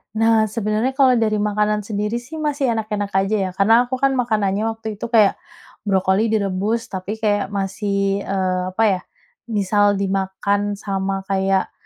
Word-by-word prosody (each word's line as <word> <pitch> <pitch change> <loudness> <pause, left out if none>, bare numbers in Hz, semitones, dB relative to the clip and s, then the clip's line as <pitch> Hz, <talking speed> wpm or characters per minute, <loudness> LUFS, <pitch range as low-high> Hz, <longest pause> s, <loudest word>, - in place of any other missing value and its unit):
Nah 225 0 +4
sebenarnya 215 +3 -1
kalau 265 -2 +4
dari 215 -2 +1
makanan 210 0 0
sendiri 210 +2 -2
sih, 255 +7 -11
masih 295 -3 -1
enak-enak 210 -2 -3
aja 195 +2 +2
ya, - - -4
karena 225 +5 +4
aku 260 - -2
kan 275 +1 +2
makanannya 215 -5 0
waktu 220 -2 -5
itu, - - -4
kayak 220 -4 +3 0.5
brokoli 190 +2 +2
direbus, 210 +1 0
tapi 190 +2 -4
kayak 210 -2 0
masih, 200 0 -1
eee, 185 -1 0
apa 225 - +2 0.2
ya, - - -15 0.5
misal 205 -1 +2
dimakan 195 +1 -1
sama 195 -1 -3
kayak 190 0 +1
210 Hz, 150 wpm, -20 LUFS, 195-225 Hz, 0.5 s, Nah